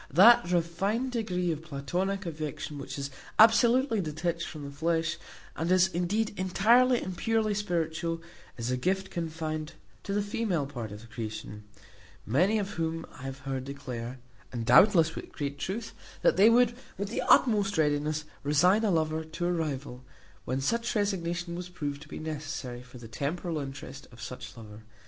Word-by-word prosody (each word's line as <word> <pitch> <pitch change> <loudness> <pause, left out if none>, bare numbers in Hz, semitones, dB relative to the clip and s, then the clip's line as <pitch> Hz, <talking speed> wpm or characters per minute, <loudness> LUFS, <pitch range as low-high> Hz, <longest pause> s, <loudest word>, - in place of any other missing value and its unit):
That 185 - +7
refined 195 +9 0
degree 180 -7 -1
of 155 -1 -3
Platonic 175 +6 -2
affection 150 -2 -5
which 140 - -6
is 140 0 -4 0.3
absolutely 230 +1 +5
detached 170 +1 -2
from 155 -3 -8
the 140 - -6
flesh, 165 +3 0 0.4
and 165 +4 -1
is, 185 0 +5
indeed, 195 +6 0
entirely 230 +7 +4
and 185 - -5
purely 220 +2 +1
spiritual, 165 -4 -1 0.4
is 120 +1 -2
a 125 - +1
gift 190 +7 -1
confined 155 -2 -3 0.3
to 200 - -6
the 205 - +1
female 205 -7 -1
part 120 -6 -6
of 105 +1 -8
the - - -13
creation; 110 -2 -6 0.6
many 180 - +3
of 200 -2 -2
whom 165 -3 -2
I - - -13
have 135 0 -6
heard 135 -1 -3
declare 130 -3 -6 0.3
(and, 120 -2 -3
doubtless, 160 - +6
with - - -7
great 140 -1 -4
truth), 215 +8 -4 0.3
that - - +5
they 200 +4 +7
would, 240 0 +5 0.2
with 200 +1 -3
the 230 - -2
utmost 205 -5 +4
readiness, 150 0 +1 0.2
resign 180 +9 +4
a 215 - +3
lover 160 -2 +1
to 160 +2 -4
a 175 - +2
rival, 140 -6 -3 0.4
when 130 +2 -1
such 230 - 0
resignation 175 -4 -1
was 180 +1 -5
proved 145 -4 -4
to - - -11
be - - -6
necessary 145 -5 -5
for 125 0 -13
the 120 -2 -10
temporal 155 - -3
interest 135 0 -7
of 120 - -15
such 125 0 -8
lover. 110 -1 -10
165 Hz, 170 wpm, -29 LUFS, 140-195 Hz, 0.6 s, That